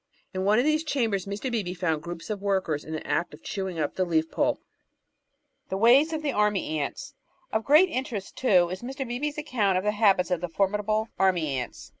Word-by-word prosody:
In 190 0 -2
one 210 +2 +4
of 245 - +3
these 310 +1 +2
chambers 225 - -1
Mr. 210 +6 -3
Beebe 195 -6 -2
found 160 -4 -1
groups 175 +4 -7
of 205 -2 -4
workers 190 -7 0
in 155 - -9
the 155 - -5
act 170 -3 -1
of 155 - -21
chewing 190 -3 -4
up 150 -2 -1
the 185 - 0
leaf 165 -2 0
pulp. - - +1 1.1
The 190 - -2
Ways 255 +9 +5
of 315 -1 -3
Army 210 - +1
Ants 275 - -5 0.4
Of 220 0 +1
great 305 +6 +6
interest, 245 - -4
too, 180 -9 +3
is 185 +1 -5
Mr. 265 +2 -5
Beebe's 285 +5 -3
account 230 -11 +1
of 185 - -1
the 210 - +2
habits 200 -4 +3
of 175 -2 0
the 175 - -3
formidable 210 +4 0
Army 180 -5 +2
Ants. 125 -2 -6
200 Hz, 205 wpm, -26 LUFS, 180-245 Hz, 1.1 s, great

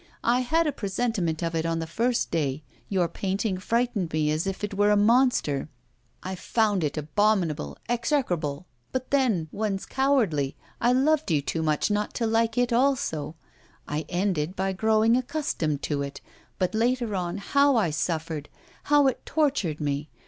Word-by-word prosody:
I 240 +1 +3
had 320 +7 +2
a 300 - +1
presentiment 195 - -2
of 165 0 -1
it 165 -1 0
on 165 0 -1
the 165 - -2
first 230 +9 0
day; 150 -2 -1 0.3
your 185 -3 +2
painting 195 +2 -2
frightened 230 -5 0
me 150 -1 +1
as 155 +5 -1
if 195 +1 -4
it 210 - -2
were 205 +1 +3
a 210 - +4
monster. 210 - +3 0.5
I 185 - -4
found 205 0 +1
it 150 0 -2
abominable, 160 - 0
execrable; 185 - -1 0.3
but 255 0 -3
then, 240 - +2
one's 200 -2 -2
cowardly, 220 - +1 0.3
I 240 - +4
loved 285 +3 +2
you 155 -3 +3
too 165 - -2
much 155 +5 +1
not 210 0 -1
to 235 - 0
like 225 0 +1
it 245 -1 +2
also; 230 - +1 0.5
I 150 +1 -3
ended 180 -2 -1
by 190 0 -1
growing 220 +3 +3
accustomed 250 - -1
to 145 -2 -1
it! 140 0 -5 0.4
But 185 +1 0
later 235 0 +1
on, 180 -1 -2
how 280 +7 +3
I 200 -9 +2
suffered! 155 0 -2 0.4
how 290 -1 +5
it 265 - 0
tortured 270 - 0
me! 145 0 -2
195 Hz, 165 wpm, -26 LUFS, 160-240 Hz, 0.5 s, how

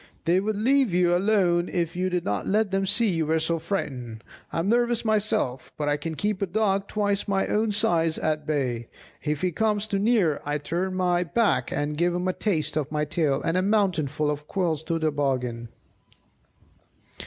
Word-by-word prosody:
"They 175 +3 +3
would 210 +2 -1
leave 250 -1 +2
you 175 -1 +3
alone 180 -3 +2
if 170 -2 -2
you 185 +1 0
did 180 -1 -2
not 100 -1 -2
let 210 0 +1
them 195 0 0
see 230 +2 +3
you 165 -3 -1
were 160 +1 +2
so 160 +1 0
frightened. 130 - -4 0.3
I - - -4
am 165 +3 0
nervous 240 0 +2
myself, 215 - 0
but 150 - -2
I 145 - +2
can 160 +2 -5
keep 205 +2 -1
a 195 - +1
dog 200 0 0
twice 205 -1 -1
my 195 -1 +1
own 215 +1 +1
size 170 -7 +2
at 155 -1 -1
bay; 125 -6 -1 0.3
if 150 -1 -2
he 185 - +1
comes 210 +3 0
too 200 -2 -1
near 200 -8 +2
I 145 +1 -1
turn 175 +6 -2
my; 180 -1 +1
back 205 +6 +1
and 145 +1 -2
give 175 +3 +1
him 180 +1 -1
a 185 - +1
taste 155 -8 -1
of 150 -2 -2
my 150 0 0
tail, 150 -2 0
and 165 - 0
a - - +3
mouthful 180 -8 +1
of 150 0 -6
quills 170 -5 -1
into 165 +1 -2
the 160 -1 0
bargain." 125 -5 -2
175 Hz, 200 wpm, -25 LUFS, 150-200 Hz, 0.3 s, They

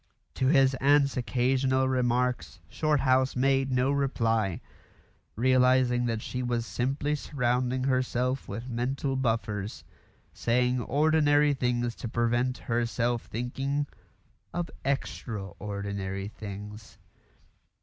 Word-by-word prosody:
To 130 - 0
his 135 -2 +5
aunt's 140 0 +4
occasional 130 +1 +1
remarks 125 -4 0
Shorthouse 135 -4 +2
made 135 +1 +2
no 130 +2 +2
reply, 115 -8 0 0.8
realising 125 0 +3
that 115 -1 -2
she 125 - -4
was 120 -2 -1
simply 140 +5 -1
surrounding 130 -3 0
herself 130 0 0
with 115 +5 -6
mental 130 +3 -2
buffers 110 -5 -2 0.5
saying 125 +1 +1
ordinary 145 +2 +3
things 120 -2 0
to - - -5
prevent 120 +2 0
herself 120 0 -1
thinking 135 +5 -2 0.7
of 170 -3 -2
extra 115 -6 -3
ordinary 100 -1 -4
things. 105 0 -9
125 Hz, 100 wpm, -28 LUFS, 115-135 Hz, 0.8 s, his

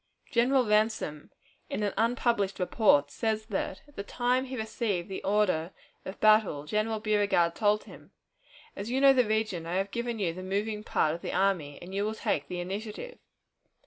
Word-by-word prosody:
General 250 +2 +3
Ransom, 210 -8 0 0.4
in 210 - -2
an 205 - 0
unpublished 230 -4 +1
report, 175 -7 +3
says 220 -1 -1
that, 190 -2 -3
at 290 - -21
the - - -4
time 245 +5 0
he 260 0 -6
received 220 -5 -2
the 190 - -5
order 190 -4 +1 0.3
of 190 - -7
battle, 215 -9 +4
General 215 +6 -1
Beauregard 205 -6 +2
told 210 +1 +2
him, - - -14 0.7
"As 200 +3 -5
you 255 +2 0
know 275 0 +7
the 250 -4 +3
region, 215 -6 -1
I 175 - -2
have 195 +1 -1
given 235 0 -3
you 180 -6 -1
the 185 - -7
moving 210 +3 -2
part 155 -6 +1
of 170 - -6
the - - -4
army, 180 -6 0
and 185 +2 -9
you 200 +1 0
will 215 +1 -2
take 145 -8 -1
the 180 - -4
initiative." 210 - -6
210 Hz, 180 wpm, -29 LUFS, 185-225 Hz, 0.7 s, know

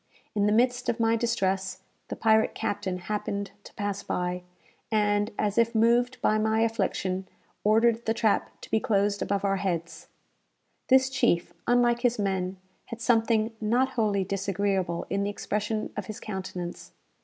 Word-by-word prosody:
In 205 -1 +2
the - - +3
midst 245 +3 +2
of 230 - -1
my 225 0 +3
distress 195 -5 -1 0.2
the - - -5
pirate 220 -1 +3
captain 205 -3 -2
happened 200 +1 -3
to - - -12
pass 205 -2 -2
by, 180 0 -2 0.5
and, 205 -1 +2
as 210 +1 +1
if 230 0 +2
moved 240 +3 +3
by 215 - +3
my 220 +1 +2
affliction, 190 -4 -1 0.4
ordered 225 +2 +3
the 225 - +3
trap 220 -2 +1
to - - -11
be 220 - +3
closed 205 -1 +1
above 200 0 0
our 195 0 +2
heads. 175 -3 -3 0.8
This 260 0 +5
chief, 175 -9 +1
unlike 240 -1 +3
his 245 -1 +2
men, 190 -2 -1 0.3
had 230 - -8
something 225 -1 +2
not 245 +5 +2
wholly 210 -4 +1
disagreeable 195 -2 -1
in 200 +1 +1
the 200 - 0
expression 210 +1 -3
of - - -4
his 215 - -6
countenance. 185 -4 -6
210 Hz, 155 wpm, -27 LUFS, 195-230 Hz, 0.8 s, This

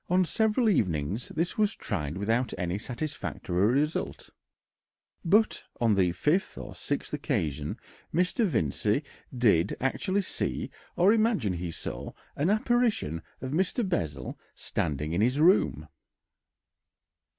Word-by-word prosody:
On 180 +1 +4
several 220 - +2
evenings 95 - 0
this 170 +6 -2
was 210 0 +2
tried 75 +3 -3
without 115 +5 0
any 90 +2 -2
satisfactory 120 - -2
result, 145 +6 -1 0.9
but 210 +5 +3 0.2
on 115 -3 +3
the 95 -3 +3
fifth 155 - 0
or - - -7
sixth 145 - -3
occasion 80 - -2 0.3
Mr. 180 +7 +1
Vincey 145 - +1 0.3
did 105 -8 +2
actually 190 +9 0
see - - -2 0.2
or 190 +5 +5
imagine 215 - +2
he 90 0 -3
saw - - -6 0.2
an 150 +6 +1
apparition 215 - +1 0.2
of 130 0 -4
Mr. 190 - +1
Bessel 80 - -3 0.2
standing 75 +2 -2
in 90 - +1
his 125 +6 +2
room. 160 - +4
130 Hz, 120 wpm, -28 LUFS, -, 0.9 s, or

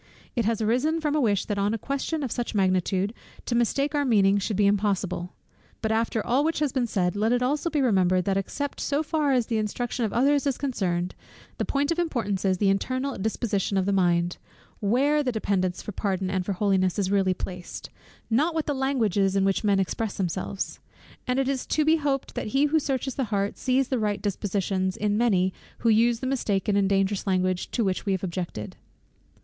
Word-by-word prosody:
It 235 -4 +1
has 225 0 0
arisen 255 +9 +1
from 300 -2 -1
a 305 - +2
wish 205 -6 +1
that 205 -2 -2
on 205 +3 +1
a - - -2
question 280 +6 -2
of 255 - -3
such 240 -2 -3
magnitude, 190 +1 +1 0.3
to - - -2
mistake 275 +5 +1
our 290 -1 +2
meaning 200 -6 +4
should 200 0 -2
be 205 - +4
impossible. 195 -3 0 0.4
But 220 - -1
after 225 -1 0
all 260 +4 +2
which 325 +1 0
has 295 -2 +1
been 255 -3 +1
said, 185 -4 0
let 215 +3 +1
it 245 0 +2
also 295 +6 0
be 300 -3 0
remembered, 185 -7 +3
that 195 - +1
except 275 +9 -3
so 290 +2 0
far 305 -2 0
as 250 -3 +2
the 225 -1 -1
instruction 235 +3 -2
of 215 - 0
others 280 +5 +2
is 270 - 0
concerned, 185 -10 -1 0.5
the - - 0
point 285 +2 0
of 335 - 0
importance 220 - -1
is, 190 -1 +2
the 195 0 +3
internal 255 +7 -1
disposition 200 -1 -1
of 190 - +1
the 200 - +1
mind; 175 -2 +1 0.4
where 270 +8 +2
the 260 -3 0
dependence 190 -5 -1
for - - -5
pardon, 190 -2 -2
and 185 -2 -1
for 200 - 0
holiness, 190 -2 +1
is 195 -2 0
really 190 -2 +2
placed; 180 -1 -7 0.4
not 300 +9 +1
what 320 - 0
the 295 - 0
language 265 -7 0
is, 195 0 +2
in 195 -1 +3
which 195 +2 +1
men 200 -2 +3
express 200 +2 -2
themselves. 190 +1 -3 0.5
And 250 0 +1
it 270 -1 +1
is 270 -2 -2
to 305 - +1
be 320 +1 +5
hoped 280 -3 -1
that - - -3
he 285 - +5
who 315 +2 +3
searches 270 -2 -2
the 265 - -1
heart, 200 -2 -1
sees 260 0 +1
the 260 - 0
right 210 -2 0
dispositions 195 -1 -1
in 210 -2 0
many 190 -5 +2 0.2
who 230 - +1
use 230 +1 +3
the - - -3
mistaken 210 -6 0
and 200 -1 +2
dangerous 195 +1 +1
language 185 -1 0
to 235 - 0
which 190 -2 -1
we 195 - +2
have 190 - -2
objected. 170 - -4
215 Hz, 215 wpm, -26 LUFS, 195-265 Hz, 0.5 s, be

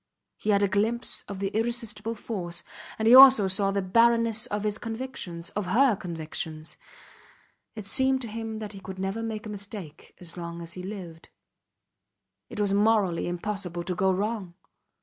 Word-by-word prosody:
He 215 - -5
had 200 -1 +4
a - - +4
glimpse 220 +5 +1
of 200 - -6
the 195 0 -2
irresistible 225 0 -2
force, 185 -6 -5 0.3
and 220 - 0
he 235 - +7
saw 260 - +13 0.2
also 195 +1 +1
the 200 -1 -1
barrenness 230 +3 +3
of 210 -3 -3
his 210 0 -1
convictions 225 -8 -6
of 205 -3 -3
her 235 +4 +4
convictions. 160 -3 -5 1.0
It 215 -3 -7
seemed 265 +6 +2
to 240 - -5
him 225 0 -5
that 215 -1 -6
he 195 - -9
could 190 -1 -8
never 195 +4 -3
make 225 0 -4
a - - -6
mistake 200 -6 -8
as 175 -2 -9
long 170 -1 -6
as 165 - -7
he 180 - -7
lived. 180 -4 -8 1.2
It 225 - -7
was 200 -1 +1
morally 205 -4 +2
impossible 175 -1 -3
to 180 - -2
go 190 +2 +2
wrong. 200 -2 -2
205 Hz, 170 wpm, -27 LUFS, 185-225 Hz, 1.2 s, saw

